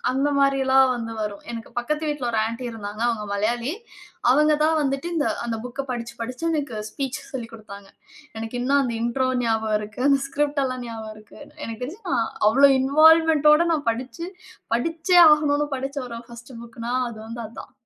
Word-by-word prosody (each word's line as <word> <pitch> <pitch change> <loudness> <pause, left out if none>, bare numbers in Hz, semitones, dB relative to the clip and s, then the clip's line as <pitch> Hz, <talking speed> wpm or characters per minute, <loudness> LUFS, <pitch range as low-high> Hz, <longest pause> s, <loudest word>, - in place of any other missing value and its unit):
அந்த 270 +3 +1
மாரில்லாம் 270 -1 +4
வந்து 230 -2 -5
வரும். 205 -1 -4
எனக்கு 230 -1 -7
பக்கத்து 300 +5 -2
வீட்ல 290 -4 -2
ஒரு 225 - 0
ஆண்டி 230 +3 -5
இருந்தாங்க. 210 0 -6
அவங்க 215 -3 -2
மலையாளி. 235 +6 -1 0.6
அவங்க 300 +3 +4
தான் 320 0 +3
வந்துட்டு, 275 +4 -2 0.3
அந்த 230 -2 -3
புக்க 250 +3 -5
படிச்சு 235 -1 -6
படிச்சு 250 +6 -6
எனக்கு 285 -7 -2
ஸ்பீச் 270 -3 -4
சொல்லிக் 235 -4 -6
குடுத்தாங்க. 200 -2 -11 0.5
எனக்கு 225 +2 -5
இன்னும் 280 +2 +3
அந்த 245 -3 -2
இண்ட்ரோ 255 +2 0 0.2
ஞாபகம் 220 -2 +1
இருக்கு. 210 +4 -6
அந்த 275 -1 +4
ஸ்கிரிப்ட்லாம் 275 -3 -1
ஞாபகம் 220 -1 -7
இருக்கு. 215 0 -16 0.3
எனக்கு 225 +1 -7
தெரிஞ்சு 345 - -6
நான் 230 -1 +1 0.2
அவ்வளவு 270 +3 +6
இன்வால்வ்மென்ட்டோட 310 +2 +5
நான் 290 -5 -2
படிச்சு, 260 +9 -5 0.5
படிச்சே 330 +7 +2
ஆகனும்ன்னு 295 -1 +2
படிச்ச 270 +2 -5
ஒரு 230 0 -6
1 235 +2 -12
புக்குன்னா 235 +1 -6 0.2
அது 220 - -10
வந்து 230 +1 -6
அதான். 235 - -11
255 Hz, 165 wpm, -23 LUFS, 230-285 Hz, 0.6 s, அவ்வளவு